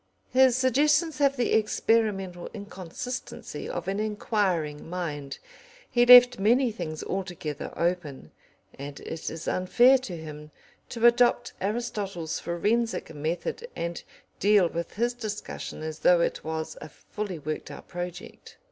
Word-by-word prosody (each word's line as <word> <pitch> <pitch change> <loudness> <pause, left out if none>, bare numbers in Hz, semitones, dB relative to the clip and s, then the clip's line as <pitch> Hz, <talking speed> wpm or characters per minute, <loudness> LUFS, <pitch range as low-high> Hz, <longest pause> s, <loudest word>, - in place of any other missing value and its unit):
His 260 -1 +6
suggestions 295 +5 +2
have 275 -1 +3
the 245 - +1
experimental 210 -4 +1
inconsistency 200 +5 -6
of - - -4
an 195 +1 -1
enquiring 195 -8 -1
man. 150 -6 -4 0.6
He 240 0 +4
left 245 -2 +9
many 240 +5 +3
things 160 -7 -5
altogether 180 -6 -4
open, 170 - -2 0.5
and 140 0 -7
it 160 - -5
is 160 0 -7
unfair 245 +8 +4
to 195 -9 -6
him 150 -1 -9 0.4
to 235 -1 -1
adopt 240 0 +4
Aristotle's 195 -6 -3
forensic 215 +5 -1
method 165 - -3
and 170 0 -4 0.4
deal 205 -2 +5
with 170 +1 -5
his 240 +4 +1
discussion 215 -8 -6
as 155 0 -5
though 175 -1 +5
it - - -1
was 160 0 -4
a 155 - -8
fully 205 +3 -6
worked 155 +1 -5
out - - -10
project. 175 0 -8
195 Hz, 130 wpm, -27 LUFS, 165-240 Hz, 0.6 s, left